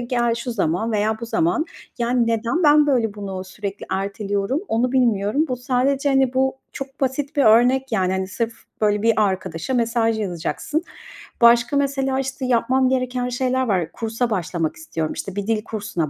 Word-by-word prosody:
"Gel, 240 -1 0
şu 235 +1 -4
zaman 200 +3 0
veya 215 +1 0
bu 235 - -5
zaman." 330 +4 +1 0.3
yani, 240 0 +1
neden 230 +8 0
ben, 295 0 +6
böyle, 230 -7 +1
bunu 195 -2 -5
sürekli 200 +1 -6
erteliyorum, 200 - -1
onu 245 +3 +1
bilmiyorum. 235 +1 +2
Bu 250 - -1
sadece, 265 +2 0
hani, 270 -2 +2
bu 265 0 +1 0.2
çok 270 0 -8
basit 275 +2 -1
bir 285 - +4
örnek, 245 +3 +4
yani, 190 -3 +1
hani, 190 0 -2
sırf, 230 +3 -2 0.3
böyle, 210 -1 +2
bir 230 0 +4
arkadaşa 190 +4 -3
mesaj 230 -1 +1
yazacaksın. 210 - -2 0.6
Başka 235 +4 +5
mesela, 270 -1 0
işte, 265 0 -3
yapmam 255 +1 +2
gereken 255 -1 -1
şeyler 255 +1 0
var. 180 -5 0
Kursa 230 +2 -2
başlamak 175 -5 -2
istiyorum. 165 - -4
İşte, 195 -1 -6
bir 205 0 -3
dil 220 -1 0
kursuna 205 -9 -3
235 Hz, 170 wpm, -22 LUFS, 205-260 Hz, 0.6 s, ben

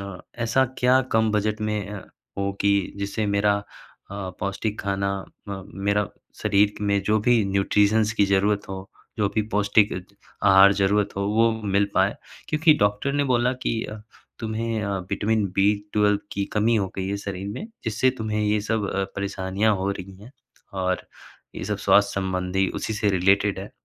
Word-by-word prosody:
न 100 -2 -7 0.2
ऐसा 125 +4 +3
क्या 125 +1 +4
कम 110 0 +3
बजट 105 +1 0
में 105 -2 -2
अ, 105 - -5 0.4
हो 100 0 -1
कि 100 -1 +2
जिससे 100 +2 -2
मेरा 100 0 +2
अ, 100 - -6 0.8
पौष्टिक 100 +2 -2
खाना 100 0 -1 0.4
अ, 95 -1 -5 0.3
मेरा 100 -1 +2 0.3
शरीर 105 0 +3
में 100 -1 +1
जो 105 +2 +2
भी 115 -1 +3
न्यूट्रिशन्स 105 +2 +2
की 105 -2 +3
ज़रूरत 100 +1 +1
हो, 95 0 -7 0.3
जो 105 -2 +2
भी 110 - +2
पौष्टिक 105 0 +3 0.5
आहार 100 0 +7
ज़रूरत 100 +1 +2
हो, 100 - -1
वो 115 +3 +3
मिल 100 0 +2
पाए? 95 +2 +3 0.3
क्योंकि 155 0 +4
डॉक्टर 105 +7 0
ने 145 0 +2
बोला 125 -1 +2
कि 115 0 -1 0.5
तुम्हें 110 0 -2
अ, 100 -1 -1
विटामिन 110 -1 +1
बी 100 +2 +4 0.2
12 105 -1 +3
की 100 0 -1
कमी 115 +2 +2
हो 100 -3 0
गई 95 -1 -2
है 100 - -1
शरीर 100 -1 -5
में, 125 - -5 0.2
जिससे 115 +3 +2
तुम्हें 110 -1 -2
ये 105 0 +1
सब 105 -1 -1
अ, 95 - 0
परेशानियाँ 100 +2 0
हो 95 +1 -1
रही 95 -1 -7
हैं 125 - -13 0.5
और 90 0 -1 0.5
ये - - -5
सब 105 +2 -2
स्वास्थ्य 100 -1 +3
संबंधी 95 0 0
उसी - - -3
से 105 -1 +1
रिलेटेड 95 +1 +2
है। 100 - -8
100 Hz, 170 wpm, -24 LUFS, 100-110 Hz, 0.8 s, आहार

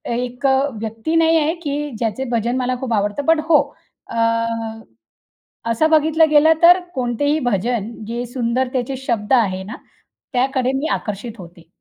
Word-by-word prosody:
एक 250 +2 -2
अ, 265 0 +4 0.2
व्यक्ती 225 +8 -3
नाही 330 0 +4
आहे 310 +1 +1
की 295 0 -3
ज्याचे 230 +2 -2
भजन 235 +1 0
मला 255 0 -1
खूप 245 -3 -2
आवडतं. 205 +7 -1
बट 325 -1 +4
हो 310 - +6 0.5
अ, - - -8 1.6
असं 310 +8 +2
बघितलं 315 +1 +4
गेलं 305 +1 +6
तर 355 +2 +8 0.2
कोणतेही 265 +4 0
भजन, 230 0 -1
जे 240 +2 -3
सुंदरतेचे 250 +1 -2
शब्द 235 -3 -2
आहे 190 -7 +2
ना, 215 +5 -8 0.6
त्याकडे 260 0 +1
मी 285 +4 -1
आकर्षित 210 +2 -4
होते. 170 -1 -13
250 Hz, 145 wpm, -19 LUFS, 230-290 Hz, 1.6 s, तर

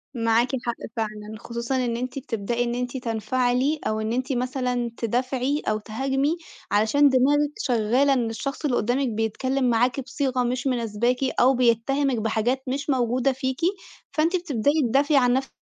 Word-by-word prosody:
معاكِ 230 +1 +2 0.2
حق 235 - -1 0.2
فعلًا، 215 -1 -4
خصوصًا 235 +3 -4
إن 235 -1 -1
أنتِ 255 +2 -4
بتبدأي 235 -2 -2
إن 240 0 -2
أنتِ 250 +1 -3
تنفعلي، 250 +5 0
أو 215 0 -1
إن 220 +1 -2
أنتِ 260 +2 -1
مثلًا 250 -1 -1
تدافعي 255 +5 -1
أو 215 - +2
تهاجمي، 270 +8 -1 0.3
علشان 220 +8 +4
دماغِك 290 +3 +3
شَغَّالة 250 - +2
إن 240 -3 0
الشَّخص 275 +7 -4
اللي 255 - +1
قُدَّامِك 250 +4 +1
بيتكلّم 250 +4 0
معاكِ 245 +3 +2
بصيغة 260 -2 -1
مش 245 +2 -1
مناسباكِ، 240 0 0 0.2
أو 260 +2 +5
بيتهمِك 250 +2 +2
بحاجات 225 +4 0
مش 280 +3 -3
موجودة 255 0 +2
فيكِ، 260 +1 -3 0.5
فأنتِ 325 +4 +1
بتبدأي 285 -6 0 0.2
تدافعي 280 +4 +3
عن 245 -2 +4
نفسِك، 270 +1 -1
250 Hz, 155 wpm, -24 LUFS, 230-270 Hz, 0.5 s, أو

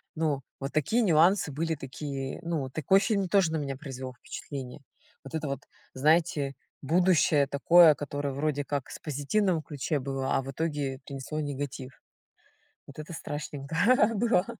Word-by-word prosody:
Ну, 155 -4 0 0.2
вот 135 +1 -5
такие 205 - +2
нюансы 175 -3 +4
были 160 +3 -1
такие, 135 0 -5
ну, 165 -6 -2
такой 155 +8 +3
фильм 195 -2 0
тоже 180 -4 +3
на - - +1
меня 140 -3 -3
произвел 130 -2 -7
впечатление. 135 -1 -7 0.4
Вот 135 - -11
это 155 -1 -2
вот, 140 0 -3 0.3
знаете, 150 0 +2 0.3
будущее 160 -2 +3
такое, 160 +3 +6
которое 145 0 -3
вроде 145 +1 -1
как 140 -2 -3
с - - -8
позитивного 160 +5 0
ключе 145 0 -2
было, 135 0 -2
а - - +1
в 135 - -6
итоге 145 -4 -2
принесло 140 +2 -5
негатив. 140 -3 -5 0.9
Вот 140 - -12
это 155 +2 -7
страшненько 145 -1 -6 0.4
было. 210 -4 +2
145 Hz, 150 wpm, -28 LUFS, 135-165 Hz, 0.9 s, такое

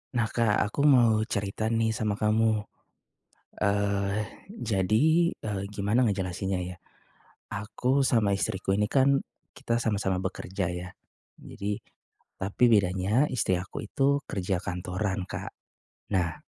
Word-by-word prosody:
Nah 115 -2 +2
Kak, 110 -2 +1
aku 140 +7 -2
mau 120 -7 +5
cerita 110 0 -2
nih 115 -1 +1
sama 105 -2 -1
kamu. 110 0 +3 1.0
Eee, 100 0 +1 0.2
jadi, 155 - +2
eee, 105 -3 -4
gimana 105 +4 +1
ngejelasinnya 95 -1 -2
ya, 90 0 -7 0.8
aku 125 +7 0
sama 110 -6 +3
istriku 95 0 -1
ini 105 +2 +1
kan 135 0 +4 0.3
kita 115 0 -1
sama-sama 100 -5 0
bekerja 95 0 -3
ya. 90 +1 -5 0.5
Jadi 100 +1 -4 0.6
tapi 100 +5 +1
bedanya 100 +7 +3
istri 105 -8 0
aku 95 +3 -6
itu 140 +5 +1
kerja 95 -6 -2
kantoran 95 +2 -3
Kak. - - -6 0.6
Nah 85 -2 +1
105 Hz, 120 wpm, -28 LUFS, 95-115 Hz, 1.0 s, mau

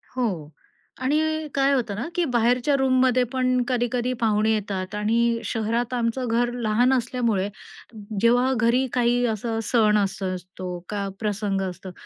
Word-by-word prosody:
हो 255 -1 +1 0.8
आणि 310 +3 0
काय 275 0 +3
होतं 235 -6 -1
ना, 235 +8 -4
की 355 - +2
बाहेरच्या 245 +4 +2
रूममध्ये 255 -1 +3
पण 255 -1 +2
कधी-कधी 245 0 0
पाहुणे 215 0 +2
येतात 195 -2 -3
आणि 230 +2 +1
शहरात 230 +2 -1
आमचं 245 +1 -1
घर 240 +1 +1
लहान 245 +2 +2
असल्यामुळे 235 -6 0 0.7
जेव्हा 245 +3 +4
घरी 240 +3 +3
काही 245 0 +2
असा 225 0 -2
सण 215 -2 +3
असं 195 -2 -1
असतो, 180 0 -7
का 200 -1 -2
प्रसंग 205 -2 -1
असतो 185 +1 -9
235 Hz, 140 wpm, -24 LUFS, 210-250 Hz, 0.8 s, जेव्हा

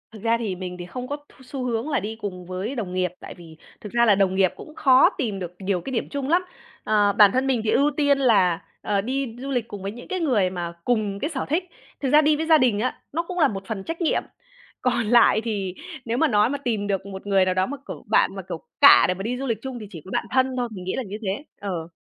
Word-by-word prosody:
Thực 220 -2 -12
ra 230 0 +3
thì 215 -5 -3
mình 180 0 -6
thì 175 - -6
không 250 +8 -6
có 285 - -3
th 290 0 -17
xu 260 0 -6
hướng 240 +3 -2
là 280 - +1
đi 220 +2 -5
cùng 190 -5 -6
với 185 +8 -4
đồng 200 -7 -4
nghiệp, 185 -1 0
tại - - -9
vì 165 -2 -14 0.2
thực 210 - -8
ra 235 0 +4
là 210 -3 +5
đồng 190 -1 +2
nghiệp 190 -2 +3
cũng 305 - -12
khó 260 -3 +6
tìm 210 -6 -2
được 180 -2 -6
nhiều 190 -2 -1
cái 270 - -6
điểm 230 - -2
chung 280 -1 -3
lắm, 350 +3 +4 0.4
ờ, 205 -1 +3
bản 205 -1 +7
thân 260 +4 0
mình 255 -4 +1
thì 220 - -1
ưu 285 +5 +3
tiên 285 -2 +3
là, 200 -10 +3 0.2
ờ, 200 -1 0
đi 255 +1 -3
du 270 +2 -6
lịch 245 -4 -1
cùng 205 -3 -8
với 195 - -3
những 240 +3 -11
cái 375 - -2
người 240 - +2
mà 175 -2 -5
cùng 215 -5 0
cái 295 - -2
sở 275 -5 -3
thích. 325 +5 +1 0.4
Thực 270 - 0
ra 300 +3 +6
đi 305 0 +3
với 315 +2 -2
gia 320 -1 +6
đình 245 -7 +2
á, 250 +3 -2
nó 335 +3 0
cũng 360 +1 -5
là 305 - +6
một 195 -5 -5
phần 205 -4 -4
trách 330 - -5
nhiệm, 330 - +1 0.6
còn 240 -2 +1
lại 235 -1 +5
thì 200 -5 -3 0.3
nếu 230 +1 -1
mà 320 - +4
nói 210 -3 +3
mà 285 - -2
tìm 225 -7 -2
được 195 -1 -1
một 195 0 -8
người 195 -2 +4
nào 185 - +1
đó, 185 0 +1
mà, 285 +6 -5
kiểu, - - -7
bạn - - +3
mà, - - -5
kiểu, - - -5 0.2
cạ - - +9
để - - +1
mà 190 +1 -7
đi 245 +4 -2
du 270 - -4
lịch 230 -3 0
chung 260 -1 -6
thì 210 - -8
chỉ 170 -6 -9
có 190 - -10
bạn - - -1
thân 260 0 +2
thôi, 245 -1 -1
mình 190 -4 -8
nghĩ 185 - -3
là 265 - -2
như 205 -1 -6
thế, 200 +6 -3 0.2
ờ. 180 -5 -4
225 Hz, 285 wpm, -24 LUFS, 195-265 Hz, 0.6 s, cạ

